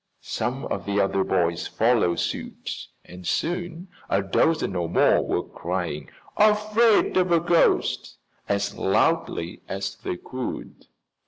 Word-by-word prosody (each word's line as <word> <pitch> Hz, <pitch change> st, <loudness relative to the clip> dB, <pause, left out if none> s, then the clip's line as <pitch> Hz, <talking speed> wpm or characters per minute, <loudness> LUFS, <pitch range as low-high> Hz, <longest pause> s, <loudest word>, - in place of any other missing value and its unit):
Some 125 Hz, +5 st, -3 dB
of 95 Hz, -1 st, -4 dB
the 100 Hz, 0 st, +1 dB
other 95 Hz, -1 st, +2 dB
boys 85 Hz, -2 st, 0 dB
followed 110 Hz, -7 st, +2 dB
suit -, -, -4 dB, 0.2 s
and 90 Hz, 0 st, -10 dB
soon 175 Hz, +1 st, -2 dB, 0.2 s
a 100 Hz, 0 st, +2 dB
dozen 100 Hz, -, +1 dB
or 85 Hz, -2 st, -1 dB
more -, -, +4 dB
were -, -, -1 dB
crying, 85 Hz, -4 st, -4 dB, 0.3 s
"Afraid 215 Hz, +1 st, +4 dB
of 180 Hz, -1 st, +2 dB
a 170 Hz, -, +5 dB
ghost!" 170 Hz, 0 st, +2 dB, 0.3 s
as 100 Hz, 0 st, 0 dB
loudly 85 Hz, -3 st, 0 dB
as 95 Hz, 0 st, -4 dB
they 90 Hz, -3 st, -4 dB
could. 130 Hz, +6 st, -7 dB
100 Hz, 130 wpm, -25 LUFS, -, 0.3 s, a